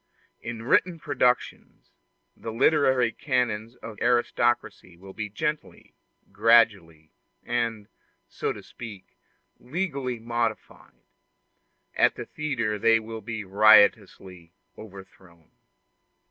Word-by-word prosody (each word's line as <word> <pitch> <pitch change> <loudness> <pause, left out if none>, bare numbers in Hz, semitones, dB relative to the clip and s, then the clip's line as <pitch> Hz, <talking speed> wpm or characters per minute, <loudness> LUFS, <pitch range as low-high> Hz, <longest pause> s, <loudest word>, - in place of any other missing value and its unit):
In 115 -1 -7
written 170 +8 +2
productions, 135 -6 -2 0.4
the 115 - -7
literary 130 -1 +2
canons 120 -5 -2
of 110 -4 -11
aristocracy 120 -6 0
will 95 +2 -13
be 105 0 -5
gently, 150 +9 -5 0.4
gradually, 100 -8 +2 0.3
and, 115 -3 -3 0.4
so - - -3
to - - -9
speak, 105 -5 -11 0.4
legally 140 -4 -4
modified; 115 -1 -5 0.9
at - - +2
the - - -7
theatre 115 -9 -3
they 115 +1 +4
will 110 0 -8
be 110 -1 -6
riotously 100 -3 +3 0.2
overthrown. 95 -5 -15
115 Hz, 95 wpm, -25 LUFS, 100-125 Hz, 0.9 s, they